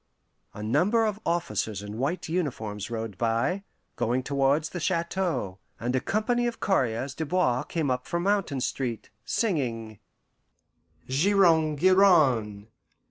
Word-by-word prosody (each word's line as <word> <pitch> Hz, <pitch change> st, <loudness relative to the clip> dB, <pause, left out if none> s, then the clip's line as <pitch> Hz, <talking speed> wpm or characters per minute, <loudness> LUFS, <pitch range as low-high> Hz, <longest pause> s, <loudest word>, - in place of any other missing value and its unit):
A 105 Hz, -, -6 dB
number 180 Hz, -, +2 dB
of 210 Hz, -1 st, -2 dB
officers 110 Hz, -, -1 dB
in 105 Hz, +2 st, -7 dB
white 150 Hz, +8 st, -2 dB
uniforms 115 Hz, -, -3 dB
rode 110 Hz, -4 st, -5 dB
by, 120 Hz, -, 0 dB, 0.4 s
going 125 Hz, +3 st, 0 dB
towards 140 Hz, +3 st, +1 dB
the 180 Hz, -, -5 dB
chateau, 170 Hz, -, -1 dB, 0.2 s
and 120 Hz, +2 st, -1 dB
a -, -, +3 dB
company 230 Hz, -, 0 dB
of 235 Hz, -, -4 dB
coureurs 130 Hz, -, 0 dB
de 160 Hz, -, -4 dB
bois 150 Hz, -7 st, +1 dB
came 155 Hz, -6 st, -2 dB
up 125 Hz, 0 st, -2 dB
from 170 Hz, 0 st, -2 dB
Mountain 195 Hz, -9 st, 0 dB
Street, 125 Hz, -3 st, -3 dB
singing: 115 Hz, -, -2 dB, 1.1 s
"Giron, 160 Hz, 0 st, +3 dB
giran! 140 Hz, -, +4 dB
140 Hz, 130 wpm, -27 LUFS, 115-180 Hz, 1.1 s, giran